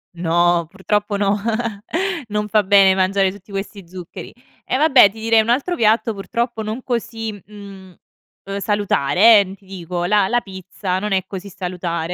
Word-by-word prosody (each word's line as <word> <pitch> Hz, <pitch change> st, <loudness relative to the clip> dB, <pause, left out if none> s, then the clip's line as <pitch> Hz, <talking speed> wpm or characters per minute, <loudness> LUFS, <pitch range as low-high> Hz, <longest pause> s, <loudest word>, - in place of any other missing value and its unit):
No, 170 Hz, 0 st, +1 dB
purtroppo 205 Hz, +2 st, -2 dB
no. 200 Hz, 0 st, +1 dB, 0.9 s
Non 210 Hz, 0 st, -2 dB
fa 215 Hz, 0 st, +3 dB
bene 195 Hz, -1 st, +5 dB
mangiare 190 Hz, 0 st, +1 dB
tutti 200 Hz, +1 st, -15 dB
questi 195 Hz, -1 st, -6 dB
zuccheri. 180 Hz, -1 st, -10 dB, 0.3 s
E -, -, -1 dB
vabbè 270 Hz, -8 st, +6 dB
ti 220 Hz, +3 st, -13 dB
direi 225 Hz, 0 st, +3 dB
un 220 Hz, -, -4 dB
altro 280 Hz, +9 st, +1 dB
piatto, 220 Hz, -3 st, +2 dB
purtroppo 230 Hz, +3 st, -3 dB
non 220 Hz, +4 st, -5 dB
così, 225 Hz, -2 st, -3 dB
mhmm, 200 Hz, -3 st, -12 dB, 0.5 s
ehm, 195 Hz, 0 st, -5 dB
salutare 205 Hz, 0 st, +4 dB
eh, 200 Hz, -, +2 dB
mhmm, 190 Hz, -, -9 dB
ti 200 Hz, -, -26 dB
dico 180 Hz, -2 st, -5 dB
la 200 Hz, +1 st, +2 dB
la 240 Hz, +3 st, +1 dB
pizza 190 Hz, -1 st, -5 dB
non 210 Hz, +1 st, -2 dB
è 190 Hz, -1 st, +1 dB
così 190 Hz, 0 st, -7 dB
salutare. 180 Hz, -2 st, -4 dB
200 Hz, 170 wpm, -19 LUFS, 185-215 Hz, 0.9 s, vabbè